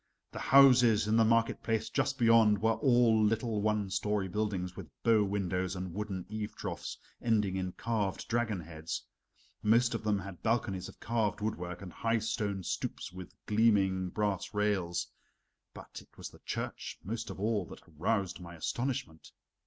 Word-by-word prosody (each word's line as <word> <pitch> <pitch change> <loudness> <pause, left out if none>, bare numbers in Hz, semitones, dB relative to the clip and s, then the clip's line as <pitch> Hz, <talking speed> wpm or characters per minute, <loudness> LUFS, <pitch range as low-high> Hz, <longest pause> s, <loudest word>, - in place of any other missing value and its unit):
The - - -6
houses 125 -6 +6
in 110 - +2
the 115 - +6
market 115 +1 +2
place 110 -2 -1
just 135 -1 0
beyond 115 -4 +5
were 110 +1 +3
all 120 -4 +4
little 110 0 +1
one 105 -2 0
story 105 -1 0
buildings 95 -2 -2
with - - -8
bow 115 -2 +5
windows 95 -2 -1
and 90 -2 -5
wooden 100 -2 -4
eave 105 0 -5
troughs - - -5 0.2
ending 105 -5 +1
in 95 -1 -2
carved 110 -4 -2
dragon 115 -5 0
heads. 80 0 -6 0.6
Most 120 +3 +4
of 115 - -3
them 105 -1 +2
had 95 -2 -8
balconies 100 -5 -1
of - - -15
carved 110 -3 0
woodwork, 90 -4 -4
and 90 - -9
high 115 0 +1
stone 105 -4 -2
stoops 90 - -4
with 90 -1 -10
gleaming 100 -4 +3
brass 105 +1 -2
rails. 100 -5 0 0.7
But - - -10
it - - -23
was - - -7
the - - -16
church - - -4
most 115 +4 -4
of - - -7
all 105 -2 0
that - - -11
aroused 95 +4 -1
my 85 -1 -9
astonishment. 85 - -3
105 Hz, 165 wpm, -32 LUFS, 95-115 Hz, 0.7 s, houses